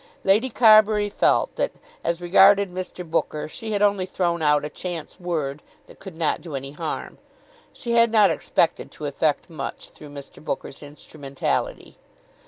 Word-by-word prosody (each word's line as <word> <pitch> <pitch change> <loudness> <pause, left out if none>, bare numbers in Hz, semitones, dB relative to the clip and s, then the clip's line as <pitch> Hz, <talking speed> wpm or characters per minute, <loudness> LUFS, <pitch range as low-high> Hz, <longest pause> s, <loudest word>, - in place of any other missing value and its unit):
Lady 215 +7 +3
Carbury 215 -3 +5
felt - - +1
that, - - -1 0.3
as 170 0 -1
regarded 195 +2 +5
Mr. 180 -1 -6
Booker, 160 -2 -2
she 220 +7 -7
had 205 -1 +1
only 200 -2 +2
thrown 175 -2 -1
out 150 -1 +3
a - - -2
chance 170 -1 -7
word 155 -5 -3 0.2
that - - -17
could 195 -3 -10
not 160 -1 0
do 160 -5 -7
any 135 0 -5
harm. 150 - -5 0.5
She 240 - -6
had 235 -1 +4
not 210 -5 +5
expected 165 +1 0
to 150 - -7
effect 145 +1 0
much 155 -6 -7
through 150 - -13
Mr. 140 +1 -11
Booker's 135 - -5
instrumentality. 145 -1 -4
175 Hz, 160 wpm, -23 LUFS, 150-200 Hz, 0.5 s, Carbury